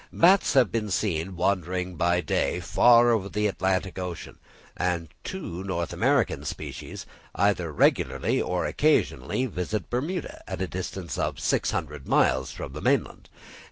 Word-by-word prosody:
Bats 185 +2 +4
have 130 -7 +4
been 110 -2 -2
seen 90 -2 -1
wandering 90 0 -1
by 85 +1 +2
day 75 - 0
far 120 0 +5
over 100 -4 0
the 105 +1 -1
Atlantic 95 -2 -1
Ocean; 90 -2 -6 0.4
and 85 -3 -1
two 95 - -5
North 85 -3 -3
American - - +1
species, - - -6 0.3
either 95 -5 +1
regularly 70 - +2
or - - -1
occasionally, 65 - +1
visit 100 -2 -4
Bermuda, 155 +9 -3
at 95 - -3
the 95 - -2
distance 90 -3 -5
of - - -2
600 75 -6 -1
miles 65 0 +2
from - - -7
the - - -7
mainland. - - 0
95 Hz, 140 wpm, -26 LUFS, 85-105 Hz, 0.4 s, far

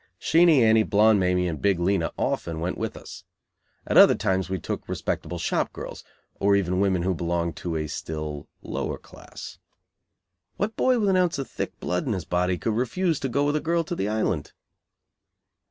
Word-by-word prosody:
Sheenie 160 -5 +5
Annie, 110 0 +5
Blonde 105 0 +4
Mamie 90 -1 +1
and 80 -4 -4
Big 100 -3 +2
Lena 85 -1 +1
often 80 -2 -2
went 85 +3 -2
with - - -4
us. - - -11 0.6
At - - +1
other - - +8
times 95 -1 -1
we 95 - -1
took 80 - -5
respectable 90 - -3
shop 85 - -1
girls, - - -8 0.4
or 100 0 +3
even 90 -2 +1
women 95 -3 +1
who 95 +1 +1
belonged 85 0 -2
to 85 -2 -4
a 80 -1 -1
still 75 -1 -5 0.2
lower - - -3
class. - - -12 1.0
What 215 +2 -2
boy 255 -1 +3
with 210 -3 +1
an 190 - +3
ounce 180 -4 +2
of 135 - -4
thick - - -5
blood 90 +5 -2
in 115 - +1
his 90 -4 -4
body 90 +1 0
could 110 - -1
refuse 155 - 0
to 135 - -2
go 140 +4 +1
with 145 +1 +1
a - - +2
girl 170 +2 0
to 175 +2 -4
the 100 -9 -2
Island? 105 -8 -1
95 Hz, 190 wpm, -25 LUFS, 85-140 Hz, 1.0 s, other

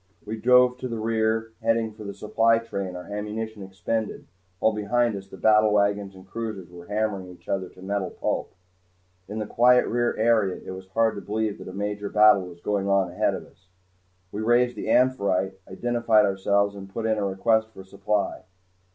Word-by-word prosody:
We 110 +1 -4
drove 125 +2 +4
to 130 - -3
the 115 -2 -4
rear, 110 0 0
heading 115 -1 +1
for 110 0 -11
the 100 -1 -6
supply 115 +2 +2
train, 100 -5 -4
our 90 - -6
ammunition 105 +1 -5
expended, 100 +3 -3 0.3
while 110 - +2
behind 115 +2 +1
us 95 0 -8
the 95 - -12
battlewagons 105 -2 +3
and 95 0 -14
cruisers 110 -6 -6
were 85 -1 -12
hammering 105 -2 -2
each 90 -1 -15
other 95 -2 -2
to 90 - -15
metal 100 -1 -2
pulp. - - -3 0.7
In 105 - -6
the 110 - -2
quiet 125 +3 +4
of - - -4
the 120 - -1
rear 120 0 +1
area 110 -4 +2
it - - -6
was 95 0 -9
hardly 110 +1 +1
believable 110 0 -3
that - - -7
a - - -11
major 105 0 -3
battle 105 -3 +5
was 85 -1 -13
going 100 0 -1
on 100 -1 +2
ahead - - +1
of - - -8
us. 95 -1 -25 0.6
We 105 - -4
raised 120 +2 +3
the - - -5
"Amphitrite," 100 -7 +2
identified 115 +1 +2
ourselves, 100 +1 +1
and 95 -1 -9
put 115 +2 -4
in 110 -1 +1
a - - -1
request 110 +3 +1
for 95 -3 -12
supply. 100 +2 -2
105 Hz, 195 wpm, -25 LUFS, 95-115 Hz, 0.7 s, battle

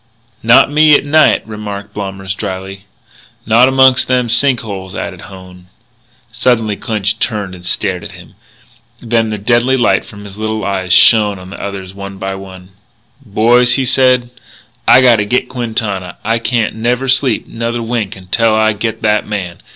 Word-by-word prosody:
"Not 115 +4 +5
me, 155 0 +5
at - - +1
night," 155 +2 +3
remarked 100 -2 -7
Blommers 95 -2 -5
drily. 95 +1 -7 0.6
"Not 115 +3 +4
amongst 130 -1 +4
them 125 -2 0
sink 125 +1 +2
holes," 95 -4 -7
added - - -6
Hone. 90 -1 -14 0.6
Suddenly 115 -3 0
Clinch 105 0 -2
turned 105 -5 -2
and 90 -1 -12
stared 90 0 -1
at - - -9
him. - - -15 0.7
Then 115 -1 0
the 105 - -3
deadly 120 +5 +1
light 120 - +2
from 105 -1 -13
his 100 0 -11
little 110 -1 -3
eyes 95 -2 -3
shone 105 +1 +5
on 90 0 -12
the - - -9
others 95 -2 -7
one 100 0 -9
by 95 0 -4
one. 95 -1 -11 0.5
"Boys," 120 +3 +3
he 135 - 0
said, 125 -1 +2 0.6
"I - - +7
gotta 120 -4 +4
get 125 +5 -1
Quintana. 110 -7 -3
I 115 +2 0
can't 115 -1 -1
never 120 +4 -1
sleep 130 -3 +2
another 115 +1 -4
wink 115 -4 -3
till 115 -1 +2
I 110 0 +2
get 110 +2 -4
that 105 0 +1
man. 95 -5 -5
110 Hz, 165 wpm, -14 LUFS, 100-120 Hz, 0.7 s, I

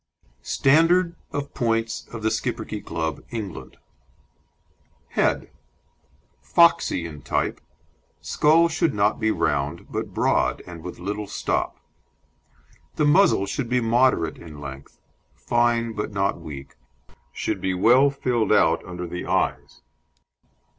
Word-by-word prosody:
STANDARD 170 - +3 0.2
OF 145 0 -4
POINTS 115 -1 -1
OF 115 -2 -7
THE 110 - +2
SCHIPPERKE - - -3
CLUB, 80 -1 -3
ENGLAND: 105 -6 -7 1.3
HEAD - - 0 0.9
Foxy 170 - +3
in 75 -3 -8
type; - - -2 0.6
skull 160 +3 +3
should 165 -4 0
not 105 +1 +2
be 110 - +1
round, 75 -5 -1
but - - -4
broad, - - +1
and 85 -2 -9
with 90 - -8
little 105 +3 -4
stop. - - -2 1.2
The 150 - +1
muzzle 145 - +4
should 120 +4 -3
be 125 - +2
moderate 115 -8 +2
in 75 -3 -11
length, 70 -1 -10 0.4
fine 120 -1 +1
but 105 0 -4
not 100 0 0
weak, 70 -3 -9 0.5
should - - -3
be 95 -1 0
well 125 +9 +5
filled 125 -5 -1
out 80 -5 +4
under 90 0 -6
the 90 +1 -6
eyes. - - -1
110 Hz, 120 wpm, -24 LUFS, 85-135 Hz, 1.3 s, well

